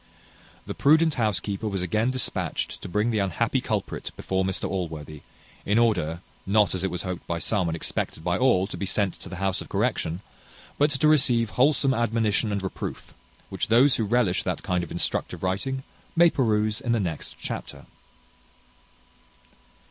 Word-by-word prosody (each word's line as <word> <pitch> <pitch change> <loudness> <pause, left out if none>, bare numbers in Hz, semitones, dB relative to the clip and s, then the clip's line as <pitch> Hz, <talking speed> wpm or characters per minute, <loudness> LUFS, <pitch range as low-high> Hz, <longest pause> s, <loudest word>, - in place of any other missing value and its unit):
The - - -4
prudent 160 +2 +4
housekeeper 105 - -1
was 95 -3 -2
again 110 +7 +1
dispatched 130 0 -2
to - - -7
bring 105 +5 +1
the 110 - +1
unhappy 95 -4 0
culprit - - -3
before 95 0 -1
Mr 95 0 -1
Allworthy, 80 -5 -5 0.4
in 105 +3 +1
order, 90 -8 +1 0.3
not 100 -2 +4
as 95 0 -2
it 95 - +1
was 90 -1 -3
hoped 90 -2 -5
by 85 - -1
some, 90 +2 0
and 80 - -2
expected 80 -1 -3
by 90 0 +1
all, 95 -4 +3
to 100 - -7
be 100 - -3
sent 100 -1 +1
to - - -9
the 95 - -6
house 95 0 -1
of - - -10
correction, 85 +4 -1 0.6
but 145 +1 +4
to 145 +1 +2
receive 125 -7 +4
wholesome 135 +1 +3
admonition 115 -2 +1
and 100 -1 -2
reproof; 95 - -6 0.4
which - - -2
those 125 +4 +5
who 115 - 0
relish 105 -4 +2
that - - -3
kind 90 -1 0
of 85 - -7
instructive 85 - -2
writing 130 +9 -1 0.3
may 170 0 +6
peruse 110 -4 +1
in 120 - 0
the 115 - +2
next 85 -6 -4
chapter. - - -6
105 Hz, 170 wpm, -25 LUFS, 90-120 Hz, 0.6 s, may